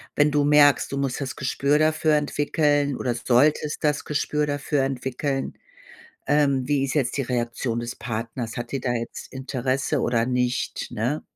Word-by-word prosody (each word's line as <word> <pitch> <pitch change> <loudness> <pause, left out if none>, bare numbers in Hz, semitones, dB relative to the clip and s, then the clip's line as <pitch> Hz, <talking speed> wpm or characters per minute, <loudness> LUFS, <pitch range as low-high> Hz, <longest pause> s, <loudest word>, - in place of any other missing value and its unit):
wenn 145 0 +4
du 145 0 +2
merkst, 145 -1 +5
du 140 - -2
musst 135 -1 -1
das 130 - -4
Gespür 140 +3 +1
dafür 155 0 +2
entwickeln 145 -1 +1
oder 125 -2 -1
solltest 145 +6 +2
das 150 -1 +1
Gespür 150 0 0
dafür 145 0 -1
entwickeln, 135 +1 -3 0.7
ähm, 140 -3 +2
wie 140 -2 +2
ist 135 - -2
jetzt 135 -4 0
die 140 - 0
Reaktion 120 -1 -2
des 120 +1 -5
Partners? 115 0 -5
Hat 120 +1 -5
die 135 - -1
da 125 -1 -1
jetzt 115 -1 -5
Interesse 130 +1 -1
oder 115 -1 +1
nicht, 125 0 -1
ne? 125 +8 -2
135 Hz, 165 wpm, -24 LUFS, 125-145 Hz, 0.7 s, merkst